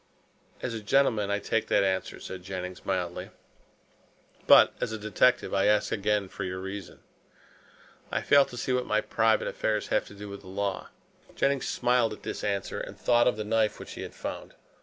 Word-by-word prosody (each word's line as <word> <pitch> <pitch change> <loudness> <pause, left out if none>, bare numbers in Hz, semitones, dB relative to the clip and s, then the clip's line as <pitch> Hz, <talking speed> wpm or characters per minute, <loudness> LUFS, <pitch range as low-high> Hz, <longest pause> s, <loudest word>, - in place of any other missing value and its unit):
"As 125 - -2
a 110 - -4
gentleman, 105 -2 +2
I 100 - +1
take 110 +2 -1
that - - +3
answer," 95 -1 -1
said 95 -1 -7
Jennings 90 0 -6
mildly, 90 -2 -2 1.2
"but - - +8
as - - -1
a 110 - -3
detective 110 +4 +2
I 100 0 +2
ask 105 0 +2
again 105 -1 0
for 95 - -6
your 95 0 -3
reason." 95 0 -7 1.1
"I - - 0
fail 140 0 +6
to 120 - -10
see 130 - -1
what 125 0 0
my 110 - +2
private 115 0 +2
affairs 105 -1 -1
have - - +1
to 105 - -12
do 105 +1 -8
with 100 0 -8
the 95 - -15
law." 100 +1 -3 0.5
Jennings 140 -1 +1
smiled 120 -2 +2
at - - -12
this - - -5
answer 100 -2 -2
and - - -7
thought 120 -1 +3
of 125 - +2
the 110 - -2
knife 110 -1 +1
which - - -9
he - - -7
had - - -8
found. - - -6
105 Hz, 195 wpm, -28 LUFS, 95-115 Hz, 1.2 s, but